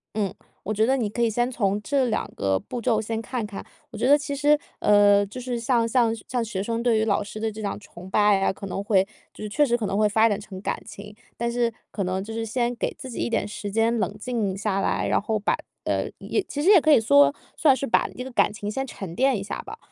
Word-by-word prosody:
嗯， 200 Hz, -4 st, -1 dB, 0.3 s
我 215 Hz, -, -2 dB
觉 220 Hz, +1 st, +2 dB
得 265 Hz, +3 st, +2 dB
你 225 Hz, -5 st, -1 dB
可 225 Hz, +4 st, -3 dB
以 235 Hz, -, +3 dB
先 240 Hz, +3 st, 0 dB
从 205 Hz, -4 st, 0 dB
这 275 Hz, +4 st, +1 dB
两 230 Hz, -, -1 dB
个 95 Hz, -1 st, +1 dB
步 245 Hz, -, -6 dB
骤 225 Hz, -1 st, +2 dB
先 220 Hz, +1 st, -3 dB
看 240 Hz, -1 st, -3 dB
看。 205 Hz, -2 st, -7 dB, 0.3 s
我 -, -, -8 dB
觉 235 Hz, -, +1 dB
得 290 Hz, +2 st, +7 dB
其 285 Hz, -1 st, -4 dB
实 295 Hz, +1 st, +4 dB, 0.2 s
呃， 205 Hz, -1 st, +5 dB
就 205 Hz, +6 st, -8 dB
是， 245 Hz, -1 st, -3 dB
像 230 Hz, -1 st, +1 dB
像 230 Hz, -1 st, +2 dB
像 245 Hz, -2 st, -1 dB
学 210 Hz, -4 st, -3 dB
生 230 Hz, +2 st, -2 dB
对 235 Hz, -2 st, +3 dB
于 215 Hz, -, +2 dB
老 205 Hz, -1 st, +1 dB
师 205 Hz, +1 st, -8 dB
的 220 Hz, 0 st, -1 dB
这 215 Hz, +1 st, -8 dB
样 205 Hz, -1 st, -3 dB
崇 185 Hz, -2 st, -12 dB
拜 205 Hz, 0 st, +4 dB
啊， -, -, +2 dB
可 195 Hz, -, -9 dB
能 195 Hz, +1 st, -4 dB
会 195 Hz, -2 st, +3 dB, 0.3 s
就 -, -, -9 dB
是 210 Hz, -, -4 dB
确 295 Hz, +8 st, +3 dB
实 240 Hz, -3 st, +1 dB
可 225 Hz, -, -3 dB
能 195 Hz, -, -1 dB
会 210 Hz, 0 st, +4 dB
发 220 Hz, +2 st, +4 dB
展 205 Hz, -2 st, 0 dB
成 200 Hz, -3 st, -9 dB
感 -, -, -3 dB
情。 205 Hz, +1 st, -10 dB, 0.2 s
但 235 Hz, 0 st, -2 dB
是， 235 Hz, -1 st, +1 dB, 0.2 s
可 200 Hz, -, -2 dB
能 185 Hz, +1 st, -2 dB
就 225 Hz, +2 st, -7 dB
是 225 Hz, 0 st, -3 dB
先 240 Hz, +2 st, -1 dB
给 -, -, -2 dB
自 260 Hz, -, -8 dB
己 235 Hz, -, -6 dB
一 -, -, -1 dB
点 230 Hz, -, 0 dB
时 205 Hz, 0 st, -6 dB
间 225 Hz, +2 st, +2 dB
冷 205 Hz, 0 st, -2 dB
静 215 Hz, -4 st, -2 dB
下 200 Hz, -1 st, -1 dB
来， -, -, 0 dB
然 -, -, +2 dB
后 215 Hz, +1 st, -1 dB
把 205 Hz, -, 0 dB, 0.3 s
呃， -, -, -1 dB
也 -, -, -1 dB
其 290 Hz, -, -5 dB
实 365 Hz, -, +4 dB
也 395 Hz, -5 st, +8 dB
可 310 Hz, -, +3 dB
以 290 Hz, -, +7 dB
说， 285 Hz, +6 st, +5 dB, 0.2 s
算 285 Hz, -4 st, +4 dB
是 275 Hz, -, -3 dB
把 230 Hz, -, +2 dB
这 250 Hz, -, -4 dB
个 265 Hz, -, -8 dB
感 240 Hz, -, +3 dB
情 205 Hz, -1 st, -5 dB
先 270 Hz, +5 st, -2 dB
沉 195 Hz, -8 st, -7 dB
淀 265 Hz, +1 st, +3 dB
一 195 Hz, -, -4 dB
下 200 Hz, -, -5 dB
吧。 430 Hz, +3 st, -9 dB
225 Hz, 290 characters per minute, -24 LUFS, 205-245 Hz, 0.3 s, 也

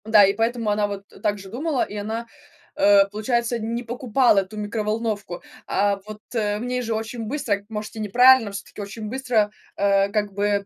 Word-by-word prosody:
Да, 215 Hz, -2 st, +7 dB
и 195 Hz, -, +2 dB
поэтому 225 Hz, +1 st, 0 dB
она 205 Hz, 0 st, +1 dB
вот, 200 Hz, -1 st, -6 dB
э, -, -, -15 dB
так 205 Hz, +1 st, 0 dB
же 195 Hz, -1 st, -11 dB
думала, 275 Hz, +5 st, -1 dB
и 210 Hz, -, -7 dB
она, 220 Hz, +3 st, -4 dB, 0.5 s
э, 200 Hz, 0 st, +6 dB
получается, 235 Hz, +3 st, -1 dB
не 230 Hz, +2 st, -3 dB
покупала 240 Hz, -2 st, +2 dB
эту 195 Hz, +2 st, -5 dB
микроволновку. 210 Hz, -2 st, -3 dB, 0.2 s
А 200 Hz, 0 st, +1 dB
вот, 215 Hz, 0 st, -9 dB
э, 210 Hz, -3 st, 0 dB
в -, -, -5 dB
ней 250 Hz, 0 st, -1 dB
же 230 Hz, -2 st, -2 dB
очень 225 Hz, +1 st, -4 dB
быстро, 215 Hz, -5 st, -1 dB
может 215 Hz, 0 st, -6 dB
и -, -, -6 dB
неправильно, 240 Hz, +2 st, +5 dB
всё-таки 200 Hz, +1 st, -8 dB
очень 205 Hz, +2 st, -6 dB
быстро, 240 Hz, -4 st, +1 dB, 0.3 s
э, 200 Hz, 0 st, +3 dB
как 205 Hz, -1 st, -1 dB
бы, 200 Hz, 0 st, 0 dB
215 Hz, 190 wpm, -23 LUFS, 205-235 Hz, 0.5 s, Да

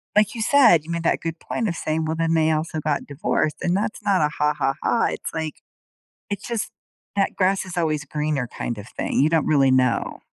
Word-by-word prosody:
like 210 Hz, 0 st, +4 dB
you 230 Hz, -, -5 dB
said, 220 Hz, -, +5 dB
you 170 Hz, -, -6 dB
made 170 Hz, 0 st, -2 dB
that -, -, +2 dB
good 165 Hz, 0 st, -5 dB
point 230 Hz, -, -2 dB
of 170 Hz, -, -2 dB
saying, 160 Hz, 0 st, -1 dB
"Well, 160 Hz, -, -1 dB
then 165 Hz, 0 st, 0 dB
they 160 Hz, -1 st, +3 dB
also 155 Hz, 0 st, -1 dB
got 150 Hz, -1 st, -1 dB
divorced," 145 Hz, +1 st, -1 dB
and 175 Hz, +1 st, +1 dB
that's 210 Hz, +3 st, -2 dB
not 200 Hz, -4 st, +2 dB
a 150 Hz, -, +3 dB
"Ha, 150 Hz, -1 st, 0 dB
ha, 135 Hz, -2 st, +1 dB
ha," 235 Hz, -, +2 dB
it's -, -, -6 dB
like 160 Hz, -2 st, -3 dB, 0.7 s
it's 205 Hz, 0 st, -4 dB
just 230 Hz, -3 st, -2 dB, 0.5 s
that, 195 Hz, -1 st, +1 dB
"grass 190 Hz, +1 st, +1 dB
is 185 Hz, -1 st, -8 dB
always 155 Hz, -3 st, 0 dB
greener 150 Hz, -3 st, -2 dB
kind 120 Hz, 0 st, -5 dB
of 105 Hz, +2 st, -9 dB
thing," -, -, -2 dB
you 150 Hz, +3 st, +4 dB
don't 165 Hz, -2 st, +1 dB
really 140 Hz, -3 st, +4 dB
know. 130 Hz, -2 st, +1 dB
160 Hz, 225 wpm, -23 LUFS, 150-190 Hz, 0.7 s, said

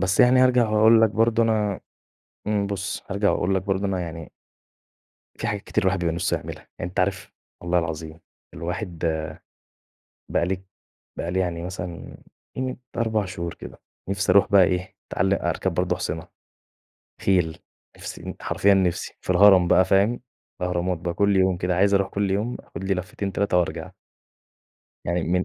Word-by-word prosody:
بس 95 Hz, 0 st, +2 dB
يعني 125 Hz, +1 st, +6 dB
هارجع 125 Hz, -3 st, +4 dB
وهاقول 110 Hz, +1 st, +5 dB
لك 110 Hz, -1 st, +4 dB
برضه 115 Hz, +1 st, +2 dB
أنا 105 Hz, -3 st, +1 dB, 0.7 s
امم، 105 Hz, -1 st, +1 dB
بُص، 100 Hz, -2 st, -4 dB
هارجع 100 Hz, +1 st, +2 dB
وأقول 95 Hz, +2 st, 0 dB
لك 95 Hz, -, 0 dB
برضه 95 Hz, 0 st, -1 dB
أنا 95 Hz, -2 st, -1 dB
يعني 80 Hz, -2 st, -7 dB, 1.1 s
في -, -, -4 dB
حاجات 100 Hz, -1 st, -2 dB
كتير -, -, -1 dB
الواحد 95 Hz, 0 st, +2 dB
بيبقى 85 Hz, -2 st, 0 dB
نفسه 85 Hz, +1 st, 0 dB
يعملها، -, -, -7 dB, 0.2 s
يعني 85 Hz, -, -3 dB
أنت 90 Hz, -, -1 dB
عارف- 95 Hz, -2 st, -1 dB, 0.3 s
والله 90 Hz, 0 st, +1 dB
العظيم- 80 Hz, 0 st, -4 dB, 0.3 s
الواحد 85 Hz, +1 st, -5 dB, 1.3 s
بقى 85 Hz, -, +2 dB
لي 95 Hz, 0 st, -3 dB, 0.6 s
بقى 85 Hz, -, -2 dB
لي 95 Hz, +1 st, 0 dB
يعني 85 Hz, -2 st, -2 dB
مثلًا 90 Hz, -1 st, -7 dB, 0.4 s
قيمة 130 Hz, 0 st, -2 dB, 0.2 s
4 110 Hz, -3 st, +1 dB
شهور 85 Hz, -3 st, -5 dB
كده، -, -, -11 dB, 0.3 s
نفسي 95 Hz, -1 st, +1 dB
أروح 100 Hz, +1 st, +5 dB
بقى 100 Hz, -2 st, +7 dB
إيه، 90 Hz, 0 st, -2 dB, 0.2 s
أتعل -, -, +1 dB
أركب -, -, -1 dB
برضه -, -, 0 dB
أحصنة، 80 Hz, +1 st, -4 dB, 0.9 s
خيل 90 Hz, -5 st, +1 dB, 0.4 s
نفسي -, -, -8 dB
ن -, -, -6 dB
حرفيًا 100 Hz, 0 st, +3 dB
نفسي، 90 Hz, -3 st, 0 dB
في -, -, -5 dB
الهرم 90 Hz, -1 st, +6 dB
بقى، 95 Hz, -, +5 dB
فاهم؟ 100 Hz, +6 st, +2 dB, 0.4 s
الأهرامات 90 Hz, 0 st, -1 dB
بقى 85 Hz, 0 st, -3 dB
كل 100 Hz, +1 st, +2 dB
يوم 95 Hz, -1 st, +3 dB
كده 90 Hz, 0 st, -1 dB
عايز 100 Hz, +2 st, +4 dB
أروح 100 Hz, 0 st, +2 dB
كل 100 Hz, -1 st, -1 dB
يوم 105 Hz, +5 st, -1 dB
آخد 90 Hz, +3 st, -9 dB
لي 95 Hz, -, +1 dB
لفتين، 95 Hz, +2 st, -4 dB
3، 100 Hz, -2 st, +1 dB
وأرجع. 90 Hz, -, -2 dB, 1.1 s
يعني 85 Hz, 0 st, 0 dB
من 90 Hz, +2 st, +1 dB
95 Hz, 165 wpm, -24 LUFS, 90-100 Hz, 1.3 s, بقى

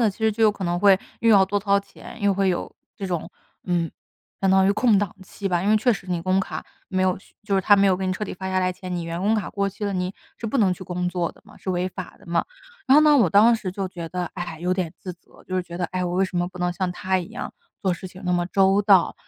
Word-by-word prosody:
的， 225 Hz, -3 st, +4 dB
其 195 Hz, -, -16 dB
实 220 Hz, 0 st, +2 dB
就 225 Hz, +2 st, -2 dB
有 215 Hz, -, +7 dB
可 200 Hz, -2 st, -6 dB
能 175 Hz, 0 st, 0 dB
会 200 Hz, -2 st, +6 dB, 0.2 s
又 230 Hz, 0 st, +4 dB
要 195 Hz, -2 st, +7 dB
多 200 Hz, +1 st, -1 dB
掏 200 Hz, 0 st, +3 dB
钱， 200 Hz, +3 st, -11 dB
又 200 Hz, -1 st, +2 dB
会 195 Hz, 0 st, +2 dB
有 180 Hz, -, -2 dB, 0.2 s
这 195 Hz, -, -4 dB
种 175 Hz, -3 st, -3 dB, 0.3 s
嗯， 175 Hz, -2 st, 0 dB, 0.5 s
相 195 Hz, -, +3 dB
当 190 Hz, 0 st, +5 dB
于 200 Hz, -, +4 dB
空 215 Hz, 0 st, +3 dB
档 200 Hz, -2 st, -2 dB
期 195 Hz, +2 st, -7 dB
吧。 175 Hz, -2 st, +1 dB
因 200 Hz, -, 0 dB
为 215 Hz, -, +5 dB
确 230 Hz, +3 st, +3 dB
实， 195 Hz, -3 st, -7 dB
你 175 Hz, -2 st, -1 dB
工 185 Hz, +2 st, +2 dB
卡 -, -, -5 dB, 0.2 s
没 185 Hz, -1 st, +1 dB
有 185 Hz, -1 st, +2 dB
续 -, -, -24 dB
就 205 Hz, -2 st, 0 dB
是 195 Hz, -, +3 dB
他 205 Hz, +2 st, +5 dB
没 200 Hz, 0 st, +4 dB
有 185 Hz, -1 st, +3 dB
给 190 Hz, -, -3 dB
你 185 Hz, -, 0 dB
彻 210 Hz, +3 st, -3 dB
底 -, -, -6 dB
发 190 Hz, +1 st, -5 dB
下 185 Hz, -, +1 dB
来 185 Hz, 0 st, +1 dB
前， 180 Hz, 0 st, -6 dB
你 170 Hz, -, -3 dB
员 165 Hz, +1 st, -4 dB
工 205 Hz, +3 st, +2 dB
卡 215 Hz, -4 st, 0 dB
过 200 Hz, -1 st, -1 dB
期 205 Hz, +2 st, -6 dB
了， 200 Hz, -, -1 dB
你 185 Hz, 0 st, -2 dB, 0.2 s
是 -, -, -12 dB
不 230 Hz, +4 st, 0 dB
能 190 Hz, -4 st, +3 dB
去 185 Hz, -, -11 dB
工 180 Hz, -1 st, -2 dB
作 175 Hz, -2 st, -1 dB
的 -, -, -22 dB
嘛， -, -, -17 dB
是 190 Hz, -, -5 dB
违 180 Hz, 0 st, 0 dB
法 185 Hz, -1 st, -8 dB
的 -, -, -19 dB
嘛。 170 Hz, 0 st, +1 dB, 0.4 s
然 270 Hz, -, +7 dB
后 -, -, +8 dB
呢， 300 Hz, -1 st, +6 dB
我 210 Hz, -, +4 dB
当 220 Hz, +4 st, +6 dB
时 215 Hz, -4 st, -3 dB
就 190 Hz, +1 st, -3 dB
觉 170 Hz, -3 st, -7 dB
得， 180 Hz, 0 st, -3 dB
唉， 175 Hz, -3 st, -5 dB
有 180 Hz, +1 st, +1 dB
点 180 Hz, -4 st, -2 dB
自 185 Hz, -, -6 dB
责， 175 Hz, -, -21 dB
就 185 Hz, -, -5 dB
是 185 Hz, -, +1 dB
觉 170 Hz, 0 st, -8 dB
得， 180 Hz, -, 0 dB
哎， 185 Hz, 0 st, -1 dB
我 175 Hz, 0 st, -2 dB
为 190 Hz, +1 st, +3 dB
什 185 Hz, -1 st, -5 dB
么 175 Hz, 0 st, 0 dB
不 180 Hz, 0 st, -12 dB
能 180 Hz, 0 st, 0 dB
像 185 Hz, 0 st, -2 dB
他 185 Hz, +1 st, -1 dB
一 175 Hz, -, -5 dB
样 -, -, -6 dB, 0.3 s
做 190 Hz, -3 st, +2 dB
事 185 Hz, +1 st, -8 dB
情 185 Hz, +2 st, -13 dB
那 180 Hz, -, 0 dB
么 175 Hz, 0 st, +1 dB
周 195 Hz, +1 st, +3 dB
到， 195 Hz, -3 st, +4 dB
185 Hz, 330 characters per minute, -24 LUFS, 180-200 Hz, 0.5 s, 后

